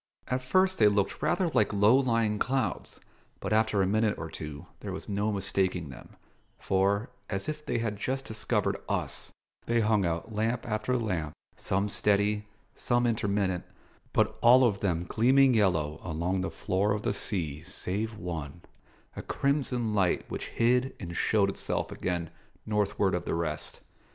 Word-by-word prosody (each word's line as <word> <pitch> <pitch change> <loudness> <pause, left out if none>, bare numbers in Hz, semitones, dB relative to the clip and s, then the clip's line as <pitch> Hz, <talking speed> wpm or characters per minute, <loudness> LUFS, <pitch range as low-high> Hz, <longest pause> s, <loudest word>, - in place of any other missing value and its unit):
At 130 0 0
first 185 +8 +2
they 105 - +7
looked 100 -1 +1
rather 185 -3 +1
like 105 -9 +2
low 105 +3 +5
lying 115 -5 +2
clouds, 130 -9 -1 0.4
but - - -2
after 110 -2 +3
a - - +2
minute 105 +2 +1
or 80 0 -6
two 75 +1 -7
there 100 - -6
was 95 - -6
no 105 +1 0
mistaking 95 -4 -1
them; 65 - -12 0.4
for, 100 +3 +1 0.2
as 95 +4 -2
if 155 0 -4
they 145 - -1
had 110 -3 -2
just 135 +5 -2
discovered 110 0 -1
us, - - -2 0.4
they 115 0 +2
hung 105 -2 +3
out 85 +5 -2
lamp 115 +3 -1
after 110 +3 0
lamp, 90 -10 -2 0.2
some 100 +2 -1
steady, 105 +1 +1 0.3
some 120 0 +1
intermittent, 100 -5 0 0.5
but - - +1
all 125 +2 +7
of 105 -5 +2
them 90 -4 0
gleaming 130 +5 +4
yellow 80 -9 +1
along 90 +3 -1
the 95 - -2
floor 100 +3 0
of 105 0 -3
the - - 0
sea 80 -8 -3
save 105 +7 -3
one, 85 -4 -6 0.5
a - - -5
crimson 130 -5 0
light 95 -4 +2
which - - -4
hid 125 +3 +2
and 85 -3 -6
showed 100 +2 +3
itself 100 - -2
again 85 -2 -3 0.3
northward 105 -2 +1
of 90 -1 -1
the - - -1
rest. 80 -3 -3
105 Hz, 160 wpm, -29 LUFS, 90-115 Hz, 0.5 s, they